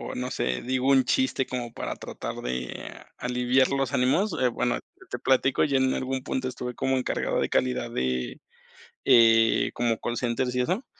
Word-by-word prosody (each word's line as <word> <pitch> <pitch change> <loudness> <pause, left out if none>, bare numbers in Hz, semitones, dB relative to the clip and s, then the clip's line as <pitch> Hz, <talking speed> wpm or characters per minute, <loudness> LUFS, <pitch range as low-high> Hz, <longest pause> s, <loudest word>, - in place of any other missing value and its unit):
no 125 0 -3
sé, 65 0 -1
digo 130 +1 -1
un 135 -1 +5
chiste 130 +1 +1
como 120 -2 -5
para - - -4
tratar, - - -6
de 65 0 -5
aliviar 125 +1 +2
los 135 -1 -1
ánimos. 155 +11 +2
Eh, 125 - +4
bueno, 120 0 -1 0.3
te - - -5
platico, 130 0 +2
yo 140 -3 +1
en 130 0 +2
algún 130 0 -2
punto, 130 -1 -2
estuve 125 -1 -5
como 130 0 0
encargado 130 - -1
de - - 0
calidad, 65 -1 0
de, 65 -1 -2 0.7
eh, 115 -1 +5
como 115 -2 0
call 120 - -3
centers 125 +1 -1
y 125 - +1
eso, 185 - 0
125 Hz, 175 wpm, -26 LUFS, 120-130 Hz, 0.7 s, un